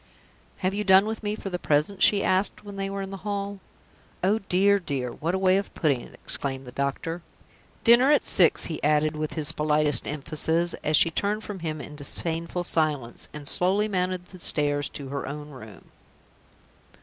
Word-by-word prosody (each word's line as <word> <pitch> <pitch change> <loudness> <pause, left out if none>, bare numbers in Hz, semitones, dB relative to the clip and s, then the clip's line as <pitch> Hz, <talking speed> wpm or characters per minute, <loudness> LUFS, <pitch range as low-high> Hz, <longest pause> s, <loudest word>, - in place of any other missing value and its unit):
"Have 185 - +1
you 210 +1 -2
done 190 0 +6
with 220 0 -4
me 210 -1 -2
for 195 -2 -7
the 180 - -3
present?" 155 +7 0
she 200 -1 +5
asked, 185 +3 +1
when 205 -1 -9
they 195 0 -3
were 195 0 -4
in 195 - -7
the 195 - -6
hall. 200 0 -4 0.6
"Oh, 205 +4 +2
dear, 200 0 +2
dear, 135 -8 -4
what 165 +8 -3
a - - +1
way 190 0 +3
of 200 - -3
putting 140 -6 +1
it!" - - -14
exclaimed 135 -1 -2
the 125 - -9
doctor. 140 +6 -3 0.6
"Dinner 240 +3 +6
at 295 - +4
six," 175 -3 +4
he 160 - -5
added, 150 +1 +2
with 155 0 -4
his 155 -1 +2
politest 150 -4 +2
emphasis, 160 +3 0
as 155 0 +3
she 165 - +4
turned 205 +5 -1
from 205 -2 -7
him 155 -2 -4
in 150 0 -9
disdainful 165 +4 -1
silence, 150 -8 -1
and 150 -1 -6
slowly 195 +7 +2
mounted 185 -2 -2
the 185 0 -14
stairs 145 -3 +2
to 140 -2 -8
her 140 0 -4
own 150 +1 -7
room. 110 -7 -13
170 Hz, 190 wpm, -25 LUFS, 150-195 Hz, 0.6 s, done